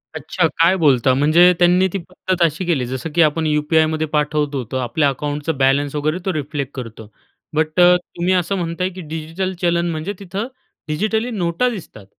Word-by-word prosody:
अच्छा, 175 -3 0
काय 170 +3 +5
बोलता? 135 -6 +3
म्हणजे 155 +6 +5
त्यांनी 180 +2 +4
ती 195 - 0
पद्धत 185 +1 -4
अशी 165 +3 0
केली, 150 -8 0
जसं 130 +5 -5
की 170 - +4
आपण 160 +1 +2
यू-पी-आयमध्ये 155 +1 +1
पाठवतो, 150 -2 -1
तो 130 - -1
आपल्या 135 +4 +1
अकाउंटचं 145 +2 -3
बॅलन्स 140 +2 +2
वगैरे 155 +3 0
तो 190 - 0
रिफ्लेक्ट 145 -2 -4
करतो. 115 -4 -8 0.5
बट 155 +2 0
अ, 180 0 +7
तुम्ही 180 +1 -2
असं 180 +2 0
म्हणताय, 175 +1 -2
की 185 0 -9
डिजिटल 165 +4 -4
चलन 170 0 +1
म्हणजे 160 +5 -4
तिथं 200 +4 -4 0.4
डिजिटली 215 +9 -1
नोटा 190 +4 0
दिसतात. 170 - -9
160 Hz, 170 wpm, -19 LUFS, 145-180 Hz, 0.5 s, अ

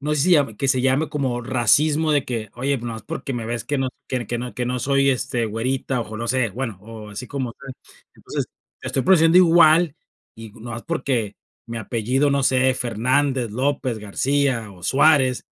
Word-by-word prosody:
no 150 +1 -1
sé 150 - 0
si 180 - +2
lla 140 -9 +3
que 135 - -1
se 130 -1 +2
llame 135 +4 +1
como 130 -4 -2
racismo 145 +6 +2
de 145 -2 +2
que 110 -4 -4
oye, 135 +3 -1
nomás 115 -2 -6
porque 155 -1 -5
me 120 -2 -4
ves 115 -1 -4
que 145 - -2
no 135 -1 0 0.2
que 125 -2 -2
que 120 - -2
no 120 -2 -6
que 125 +2 -2
no 125 +1 -2
soy, 135 +2 +2
este, 120 -2 -1
güerita 125 +4 -2
o 110 -1 -6
no 115 +1 -4
sé, 125 -2 +1
bueno, 115 -2 -5
o 110 0 -10
así 105 +5 -7
como 130 -4 -4
tú. 140 - -15 0.5
Entonces, - - -5 0.4
estoy 135 - -1
produciendo 165 -1 +5
igual 165 -2 +5 0.4
y 115 -1 -10
nomás 115 +1 -8
porque 120 -6 -2 0.3
mi 115 -1 -5
apellido, 125 +6 0
no 140 -1 +1
sé, 130 0 +3
Fernández, 125 +2 0
López, 130 0 -1
García 125 +2 -1
o 90 -2 -16
Suárez, 135 -1 +3
130 Hz, 195 wpm, -22 LUFS, 115-140 Hz, 0.5 s, produciendo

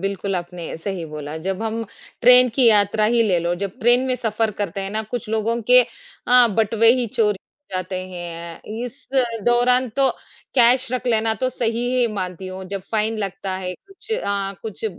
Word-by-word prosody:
बिल्कुल 195 0 -2
आपने 175 -1 -6
सही 180 +1 -4
बोला 150 +1 -6
जब 195 +3 -2
हम 225 +1 -2 0.4
ट्रेन 250 +1 +7
की 255 -2 +4
यात्रा 210 -1 +4
ही 235 - +4
ले 180 -3 +3
लो, 170 +1 -1
जब 195 +5 -5
ट्रेन 240 +2 +4
में 255 - +1
सफ़र 225 -1 0
करते 200 0 -2
हैं 195 - -4
ना 215 +1 -2
कुछ 240 -2 -4
लोगों 225 +2 0
के 250 0 +9 0.5
अ, 250 -1 +7
बटवे 225 +2 +3
ही 250 -2 -1
चोरी 210 -2 0 0.3
जाते 185 0 -3
हैं। 170 -2 -7 0.2
इस 245 +3 -10 0.4
दौरान 250 +1 +3
तो 270 -1 +4 0.5
कैश 250 0 +4
रख 255 0 -2
लेना 225 -1 +2
तो 255 +5 -1
सही 235 -1 -1
ही 245 -2 +3
मानती 185 -2 -5
हूँ। 185 0 -7
जब 200 -1 -4
फ़ाइन 220 0 0
लगता 195 -1 -4
है 180 -1 -4
कुछ 395 +3 -11
अ, 200 - -1
कुछ 220 0 -7
215 Hz, 185 wpm, -21 LUFS, 190-240 Hz, 0.5 s, के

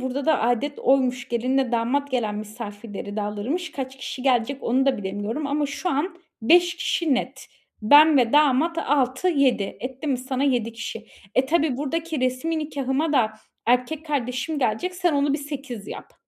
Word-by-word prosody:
burada 260 +2 -3
da 315 -3 +3
âdet 245 +5 0
oymuş, 255 -1 +1
gelinle 250 +2 0
damat 255 +5 0
gelen 230 -5 -1
misafirleri 210 -1 -7
de 210 - -1
alırmış. 245 - -3
Kaç 265 -2 -6
kişi 260 -1 -6
gelecek 260 +1 +1
onu 260 +3 +1
da 275 - +3
bilemiyorum 205 +8 -3
ama 290 +1 0
şu 285 +6 -3
an 345 +5 -2 0.2
5 350 +7 +5
kişi 335 -3 +1
net. 265 +1 -4 0.4
Ben 295 +7 +7
ve 240 -3 +3
damat 300 +3 +3
6-7. 270 - +1
Etti 260 +4 -6
mi 270 -4 +1
sana 260 +1 -3
7 240 -5 +1
kişi. 230 0 -7 0.3
E, 260 - +3
tabii 305 -3 +1
buradaki 315 +2 -2
resmî 255 +6 0
nikâhıma 290 0 -1
da 230 -6 +2 0.3
erkek 250 +7 +1
kardeşim 280 +1 -2
gelecek, 265 +9 -1
sen 355 -2 +1
onu 285 0 +2
bir 290 - 0
8 275 -7 -7
yap. - - -9
265 Hz, 165 wpm, -24 LUFS, 245-295 Hz, 0.4 s, Ben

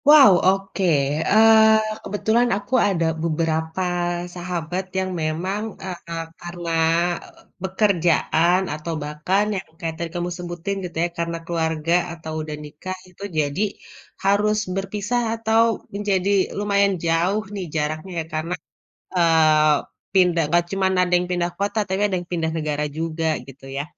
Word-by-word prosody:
Wow 295 -7 +9 0.2
oke, 195 +1 0 0.5
eee, 220 0 +6
kebetulan 220 +4 +1
aku 205 +5 -9
ada 175 -4 +1 0.2
beberapa 160 +1 -1 0.5
sahabat 175 0 -3
yang 190 0 0
memang, 175 +6 -1 0.2
eee, 185 -1 -4
ka 170 - -5 0.3
karena, 175 -1 -5 0.9
pekerjaan 180 -2 +2
atau 155 +2 -4
bahkan 150 +7 0
yang 190 0 -5
kayak 165 -3 -3
tadi 170 - -2
kamu 175 0 -2
sebutin 175 +2 -4
gitu 175 -2 -6
ya - - -2
karena 170 0 -1
keluarga 160 -1 -1 0.2
atau 160 -1 -7
udah 155 -1 -5
nikah 165 +5 -7
itu 180 +2 -13 0.2
jadi, 145 +4 0 0.6
harus 205 +2 +3 0.2
berpisah 205 +5 -1 0.2
atau 225 0 +3 0.3
menjadi 200 -2 0 0.3
lumayan 200 -1 +2
jauh 175 +6 +1
nih 195 -3 -4
jaraknya 155 +4 -2
ya 160 - -3
karena, 160 +3 -2 0.6
eee, 160 -3 +5 0.4
pindah 180 -3 +4
nggak 175 +2 +3
cuman 190 -1 +1
ada 180 0 +1
yang 180 0 -2
pindah 175 -1 0
kota 200 +2 -2
tapi 190 +1 0
ada 190 - 0
yang 175 - -5
pindah 165 -2 0
negara 150 -1 -1
juga 165 0 -2 0.2
gitu 135 0 -13
ya. 140 - -1
175 Hz, 140 wpm, -22 LUFS, 160-200 Hz, 0.9 s, Wow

